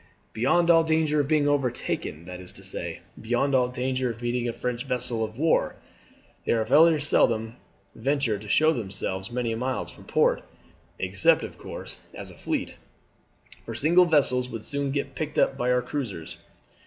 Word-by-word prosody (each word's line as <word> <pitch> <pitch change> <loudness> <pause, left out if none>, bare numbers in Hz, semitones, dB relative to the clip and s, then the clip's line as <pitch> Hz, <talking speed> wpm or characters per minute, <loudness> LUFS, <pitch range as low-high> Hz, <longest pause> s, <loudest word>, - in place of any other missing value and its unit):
"Beyond 170 +9 +3
all 165 -1 +6
danger 160 -2 +2
of 145 - +1
being 150 -1 +2
overtaken 125 - -1
that 90 0 -8
is 90 - -10
to - - -14
say, - - -6 0.2
beyond 120 +5 0
all 125 -2 +4
danger 130 0 -1
of 115 -1 -6
meeting 120 0 -1
a - - -3
French 125 0 -3
vessel 120 -2 -1
of 110 +1 -5
war. 160 +3 +2 0.7
They - - +1
very 150 +8 +5
seldom 115 -5 +1 0.4
venture 130 -3 0
to 105 - -11
show 155 +8 +4
themselves 95 -3 -3
many 120 -1 -2
miles 125 +3 -2
from - - -15
port, - - +2 0.6
except, 95 0 +3
of - - -8
course, - - -8 0.2
as - - -7
a - - -13
fleet; - - -3 0.9
for 115 - -7
single 170 +9 +5
vessels 130 -6 +2
would 115 -3 -7
soon 140 -1 -2
get 140 0 -2
picked 155 -2 -4
up 135 - +3
by 125 -2 -1
our 125 0 +2
cruisers. 115 - -5
125 Hz, 170 wpm, -26 LUFS, 115-145 Hz, 0.9 s, all